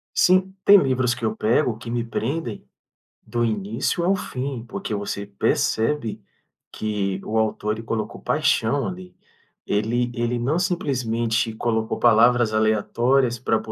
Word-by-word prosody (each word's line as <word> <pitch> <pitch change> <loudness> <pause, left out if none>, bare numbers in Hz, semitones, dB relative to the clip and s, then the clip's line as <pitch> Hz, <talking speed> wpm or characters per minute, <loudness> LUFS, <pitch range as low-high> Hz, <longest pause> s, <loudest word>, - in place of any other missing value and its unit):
Sim. 185 +1 +3
Tem 205 - +9
livros 130 -6 +2
que 120 -1 -10
eu 110 -1 0
pego 115 +2 +1
que 115 - -9
me 120 0 -1
prendem 115 +1 -4 0.6
do 120 0 -2
início 110 - -1
ao 190 +3 +3
fim, 130 -8 -4
porque 110 - -4
você 100 0 -4
percebe 110 +4 0 0.5
que 100 -3 -2
o 110 - -1
autor, 105 -1 0
ele 110 - -8
colocou 110 -1 -4
paixão 145 -5 +1
ali. 90 -1 -7 0.5
Ele 120 +4 0
ele 120 0 -1
não 135 +8 0
simplesmente 120 - 0
colocou 110 0 -1
palavras 120 0 +4
aleatórias 120 +4 +2
pra 110 -2 +1
115 Hz, 135 wpm, -23 LUFS, 110-130 Hz, 0.6 s, Tem